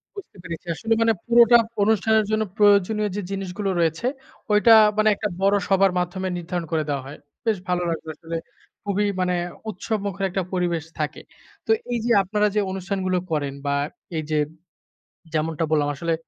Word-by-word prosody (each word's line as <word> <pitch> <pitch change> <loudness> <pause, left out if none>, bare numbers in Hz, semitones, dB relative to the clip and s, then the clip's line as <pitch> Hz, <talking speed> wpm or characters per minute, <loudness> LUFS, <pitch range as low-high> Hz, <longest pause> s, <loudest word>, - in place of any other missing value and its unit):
বুঝতে 390 - -10
পেরেছি। 170 0 -7
আসলে 225 +4 0
মানে 225 0 +4
পুরোটা 235 0 +7 0.3
অনুষ্ঠানের 220 0 +3
জন্য 215 0 +2
প্রয়োজনীয় 205 +1 +4
যে 205 - -2
জিনিসগুলো 195 0 -3
রয়েছে, 165 +8 +1 0.5
ওইটা 225 +2 +6 0.2
মানে 215 0 +4
একটা 210 - -2
বড় 200 +1 +4
সভার 195 -1 +4
মাধ্যমে 185 +2 -2
নির্ধারণ 175 0 -4
করে 155 -1 +1
দেওয়া 140 -2 -2
হয়। 145 - -9 0.3
বেশ 220 -3 +2
ভালো 180 0 +1
লাগবে 160 -1 -4
আসলে 165 0 -5 0.5
খুবই 205 0 0 0.2
মানে 180 0 +1 0.3
উৎসবমুখর 200 -1 -3
একটা 190 0 -2
পরিবেশ 175 -3 0 0.2
থাকে। 150 - -3 0.4
তো - - 0 0.2
এইযে 235 0 -1
আপনারা 210 +2 +1
যে - - +3
অনুষ্ঠানগুলো 190 -1 -2
করেন 145 -3 -1
বা, 140 0 +1 0.4
এইযে 155 0 -2 1.0
যেমনটা 160 +1 0
বললাম 145 -2 +2
আসলে, 165 +3 -1
190 Hz, 155 wpm, -23 LUFS, 165-210 Hz, 1.0 s, পুরোটা